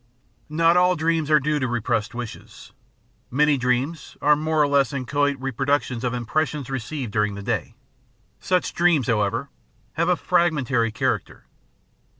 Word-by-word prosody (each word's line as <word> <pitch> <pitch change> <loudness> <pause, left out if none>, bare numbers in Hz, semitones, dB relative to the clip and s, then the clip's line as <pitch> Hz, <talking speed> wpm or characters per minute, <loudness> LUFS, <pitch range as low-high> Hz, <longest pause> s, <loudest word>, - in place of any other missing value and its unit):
Not 165 +3 +3
all 180 0 +4
dreams 160 -1 0
are 155 0 +6
due 150 +2 0
to 130 - -1
repressed 115 -2 -1
wishes. 120 -2 -9 0.6
Many 150 +3 +3
dreams 130 +5 -2
are 150 +1 +4
more 155 +1 -1
or 150 - +4
less 140 -1 +2
inchoate 140 +1 0
reproductions 135 -1 -1
of 125 - 0
impressions 140 +3 -2
received 135 -1 -4
during 105 -1 0
the 100 - -7
day; - - -3 0.6
such 180 -1 0
dreams, 170 -7 +3
however, 105 -5 0 0.4
have 170 +2 0
a 180 - +4
fragmentary 145 -11 +1
char 110 - 0
acter. - - -19
140 Hz, 150 wpm, -23 LUFS, 120-155 Hz, 0.6 s, are